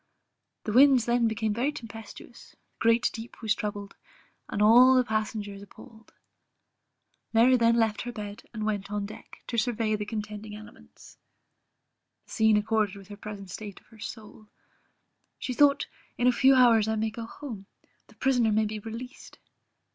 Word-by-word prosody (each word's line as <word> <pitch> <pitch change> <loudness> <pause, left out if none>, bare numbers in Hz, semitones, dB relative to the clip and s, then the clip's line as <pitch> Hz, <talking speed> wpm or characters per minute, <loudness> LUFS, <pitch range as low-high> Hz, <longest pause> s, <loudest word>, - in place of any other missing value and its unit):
The 215 - -3
winds 260 -1 +6
then 240 -1 +2
became 220 -1 -1
very 250 +7 0
tempestuous, 225 -3 -11
the - - -42 0.2
Great 230 +1 +3
Deep 230 +1 -9
was 215 -1 +2
troubled, 205 -2 -5 0.5
and - - -3
all 245 +5 +7
the 255 - +4
passengers 215 -3 -3
appalled. 220 +2 -15 1.2
Mary 240 +3 +5
then 230 -1 +3
left 225 -2 +1
her 245 - -5
bed, 210 -1 -7
and 215 -2 -4
went 205 -2 -2
on 205 -1 -3
deck, 210 - -12
to 235 - -1
survey 220 -2 0
the 210 0 -5
contending 210 0 -6
elements: 215 0 -15 1.1
the - - -19
scene 220 -2 +3
accorded 215 -1 0
with 200 -1 -13
the 205 - -8
present 200 -2 -9
state 205 +1 -8
of - - -31
her 220 - -18
soul; 215 0 -9 0.9
she 255 - -4
thought 280 +2 +4 0.3
in 245 - 0
a 250 - +6
few 265 +2 +5
hours 230 -4 +5
I 220 - 0
may 220 0 -1
go 225 +1 -7
home; 225 -8 -9 0.4
the - - -21
prisoner 245 -4 +2
may 215 +1 +2
be 215 0 -4
released. 230 +5 -9
220 Hz, 165 wpm, -27 LUFS, 210-235 Hz, 1.2 s, all